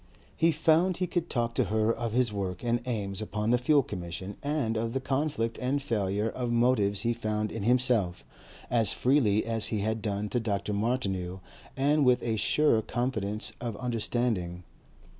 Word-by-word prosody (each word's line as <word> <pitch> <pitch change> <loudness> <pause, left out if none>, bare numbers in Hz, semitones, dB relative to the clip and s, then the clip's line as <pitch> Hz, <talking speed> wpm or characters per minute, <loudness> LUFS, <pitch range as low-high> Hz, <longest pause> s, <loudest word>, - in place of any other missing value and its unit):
He 165 +1 +3
found 165 +4 +3
he 185 - 0
could 175 -1 -2
talk 120 -3 -1
to - - +1
her 110 +1 +1
of 115 -1 -3
his 120 -3 +2
work 95 -2 -3
and 120 0 +1
aims 100 -5 -2
upon 110 +1 -1
the 125 - +4
Fuel 140 +3 +4
Commission 90 -1 -6
and 140 -6 -1
of 115 +1 -2
the 135 - 0
conflict 135 -3 -1
and 130 +3 +1
failure 105 -5 -1
of 120 +1 -3
motives 115 -5 +2
he 120 +2 +1
found 110 -2 -2
in 115 - -5
himself, 120 -5 +2 0.5
as 115 -3 +2
freely 120 -6 +2
as 115 -1 0
he 105 -3 -1
had 110 +1 -1
done 105 -1 -2
to 120 - 0
Dr. 105 -2 -2
Martineau 100 -5 -1 0.4
and 145 +2 +3
with 125 -1 +3
a 115 -2 0
surer 115 +3 +3
confidence 110 -3 -2
of 115 -3 -4
understanding. 115 -7 -1
115 Hz, 175 wpm, -29 LUFS, 105-125 Hz, 0.5 s, the